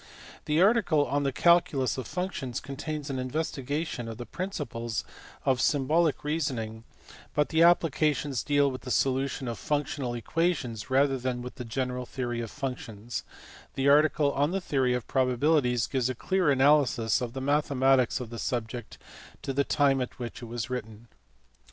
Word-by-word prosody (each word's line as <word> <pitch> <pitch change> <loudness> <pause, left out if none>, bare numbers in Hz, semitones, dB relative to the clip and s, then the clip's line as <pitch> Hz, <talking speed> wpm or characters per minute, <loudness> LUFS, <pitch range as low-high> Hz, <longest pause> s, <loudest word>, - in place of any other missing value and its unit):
The 150 +1 +1
article 190 -9 +3
on 145 +1 0
the 140 -1 0
calculus 165 -4 +3
of 130 - -5
functions 180 -9 -3
contains 145 +1 -5
an 130 - -2
investigation 140 -1 -3
of 115 -1 -6
the 120 - -6
principles 120 - -4 0.4
of 130 -3 +2
symbolic 155 +3 +2
reason 150 -3 -1
ing, 110 0 -6 0.5
but 150 0 +2
the 160 0 +2
applications 150 -5 +3
deal 145 -1 +2
with 130 - -7
the 130 - -8
solution 135 0 0
of 115 -2 -4
functional 140 -4 -2
equations 125 - -1
rather 135 0 +3
than 125 -1 -2
with 125 - -7
the 125 -2 -7
general 125 +1 -3
theory 120 -2 -3
of 115 - -5
functions: 120 -5 -5 0.5
the 135 +1 +2
article 150 0 +4
on 145 +2 +2
the 195 +2 -1
theory 130 -8 +1
of 125 - -3
probabilities 130 -1 +2
gives 130 -2 0
a 130 - -2
clear 185 +5 +1
analysis 135 -5 +3
of 120 -2 -4
the 135 - -4
mathematics 135 -3 +2
of 120 -2 -7
the 115 - -6
subject 120 -1 -4 0.5
to 135 - -2
the 140 +1 +2
time 140 -2 +2
at 125 - -5
which 120 -1 -6
it - - -6
was 115 0 -4
written. 115 -2 -6
135 Hz, 165 wpm, -28 LUFS, 125-150 Hz, 0.5 s, article